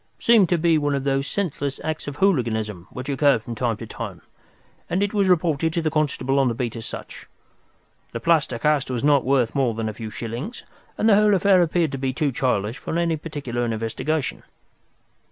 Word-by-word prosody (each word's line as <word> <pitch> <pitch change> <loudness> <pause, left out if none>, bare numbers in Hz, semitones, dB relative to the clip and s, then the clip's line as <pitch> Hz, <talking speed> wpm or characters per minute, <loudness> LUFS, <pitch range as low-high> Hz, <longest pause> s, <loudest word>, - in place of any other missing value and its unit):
It - - -20
seemed 225 -6 +5
to 175 - +3
be 165 -1 +3
one 145 -1 0
of 135 - -2
those 135 0 0
senseless 145 -8 -3
acts 155 -1 -4
of 145 - -5
hooliganism 110 - 0
which 125 +1 -7
occur 140 -1 +3
from 115 +2 -7
time 115 -1 -1
to - - -7
time, - - -7 0.7
and 180 +3 +1
it 205 - -1
was 200 -2 +2
reported 160 -3 +2
to 170 - 0
the 155 - 0
constable 140 -3 0
on 135 - +3
the 120 - 0
beat 120 -1 -3
as 115 - -6
such. - - -9 0.8
The 115 - -4
plaster 150 -3 +2
cast 150 +1 +1
was 125 -1 -2
not 145 -2 +4
worth 130 -3 +2
more 130 -5 +1
than 115 0 -2
a 110 - -3
few 110 0 -7
shillings, 120 - -6 0.3
and 215 - +1
the 220 - +6
whole 210 -1 +4
affair 190 0 +4
appeared 170 -2 +1
to 135 - -4
be 130 -1 -1
too 150 0 0
childish 115 -3 -1
for 165 - -3
any 170 -1 +1
particular 145 -6 -4
investigation. 115 +6 -2
140 Hz, 210 wpm, -23 LUFS, 120-165 Hz, 0.8 s, the